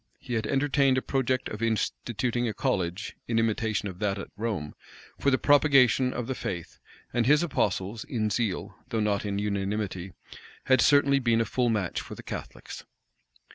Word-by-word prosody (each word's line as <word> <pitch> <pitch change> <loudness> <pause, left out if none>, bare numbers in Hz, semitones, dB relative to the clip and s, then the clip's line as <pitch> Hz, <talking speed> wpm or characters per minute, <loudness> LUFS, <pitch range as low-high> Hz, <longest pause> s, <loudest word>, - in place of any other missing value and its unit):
He 120 - -7
had 110 -2 -1
entertained 135 0 +2
a - - +2
project 130 -1 0
of 105 - -7
instituting 120 +1 -1
a 110 - -3
college, 90 +3 -2
in 115 - 0
imitation 110 -2 0
of 95 -2 -8
that 100 -2 0
at 100 - -7
Rome, 100 -9 -3 0.5
for 140 - +3
the 130 - +3
propagation 135 -4 +4
of 120 - -3
the 130 - -2
faith; 85 -8 -6 0.3
and 120 -1 +1
his 150 +3 +5
apostles, 105 - -1
in 110 -3 -1
zeal, 105 -3 -2
though 115 - -1
not 105 -1 0
in 100 -1 -2
unanimity, 100 -2 -2 0.5
had 130 -2 +4
certainly 140 0 +5
been 120 -3 +2
a 115 - +2
full 125 0 0
match 105 -6 -1
for - - -9
the - - -11
Catholics. - - -7
115 Hz, 175 wpm, -27 LUFS, 100-130 Hz, 0.5 s, his